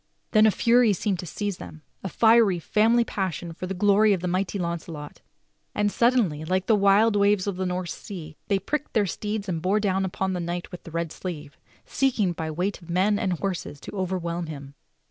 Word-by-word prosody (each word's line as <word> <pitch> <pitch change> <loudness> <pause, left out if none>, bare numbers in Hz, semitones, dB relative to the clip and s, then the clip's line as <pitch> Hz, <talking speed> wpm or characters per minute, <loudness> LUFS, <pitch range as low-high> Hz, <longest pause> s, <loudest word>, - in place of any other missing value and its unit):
Then 215 0 +6
a - - +6
fury 235 +1 +4
seemed 195 0 -1
to 180 - -6
seize 205 +2 -3
them 155 0 -11
— - - -42
a 190 - -3
fiery 220 -2 +4
family 225 +7 +3
passion 185 -6 -3
for 185 +2 -6
the 195 - -4
glory 205 +2 +4
of 185 - -2
the 180 - -2
mighty 185 +2 -1
Launcelot; 170 -4 -5 0.5
and 205 0 +1
suddenly, 230 -12 +2
like 185 +3 0
the 220 - +4
wild 205 +2 +4
waves 200 -1 +3
of 200 -2 -2
the 185 0 -1
North 180 0 -3
Sea, 165 -6 -8
they 200 - +2
pricked 295 +10 -3
their 210 -2 +3
steeds 210 +3 -4
and 165 -3 -2
bore 190 +5 +2
down 195 -2 0
upon 190 0 -2
the 180 - -2
knight 175 +1 -4
with 180 - -10
the - - -8
red 165 -1 -2
sleeve, 155 -6 -7 0.3
seeking 235 -9 +1
by 160 -1 -4
the 155 - -4
weight 185 +5 -2
of 170 - -15
men 195 +4 +2
and 185 - 0
horses 175 -4 -4
to - - -8
overwhelm 175 -3 -2
him. 140 -3 -8
190 Hz, 215 wpm, -25 LUFS, 170-205 Hz, 0.5 s, Then